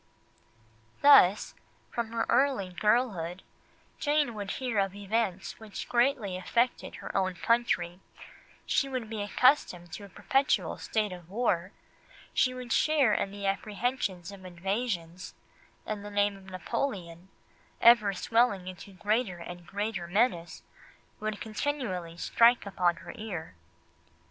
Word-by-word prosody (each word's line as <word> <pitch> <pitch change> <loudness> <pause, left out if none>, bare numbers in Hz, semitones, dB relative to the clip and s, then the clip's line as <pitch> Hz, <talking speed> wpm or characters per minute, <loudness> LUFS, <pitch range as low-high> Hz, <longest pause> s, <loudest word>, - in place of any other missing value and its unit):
Thus, 215 -9 +7 0.4
from 235 -2 -3
her 230 -1 0
early 255 -6 +2
girlhood, 190 -3 0 0.6
Jane 295 -4 +1
would 205 -2 -5
hear 245 -5 -1
of 195 0 0
events 200 -2 -2
which 220 -2 -7
greatly 240 -6 +1
affected 235 +7 0
her - - -8
own 185 -1 +1
country, 180 -5 +1 0.7
she 275 - +1
would 250 -4 -4
be 215 -2 -3
accustomed 205 - +2
to 205 - -7
a 200 - -11
perpetual 270 - +1
state 215 -2 -1
of 175 -2 -10
war, 195 -4 0 0.6
she 255 - +3
would 250 -1 -4
share 290 -8 +3
in 200 - 0
the 200 0 -7
apprehensions 200 -2 -2
of 195 -1 -12
invasions, 185 -1 -3 0.5
and 210 -1 -4
the 205 - -7
name 205 0 +1
of 195 -1 -14
Napoleon, 185 -2 -4 0.5
ever 235 -3 +6
swelling 225 -3 +2
into 185 +2 -9
greater 210 0 0
and 175 0 -9
greater 205 -3 -3
menace, 175 -3 0 0.6
would 215 -1 -3
continually 215 - -3
strike 235 +5 +4
upon 180 -3 +1
her - - -7
ear. 185 - -6
205 Hz, 130 wpm, -29 LUFS, 185-235 Hz, 0.7 s, Thus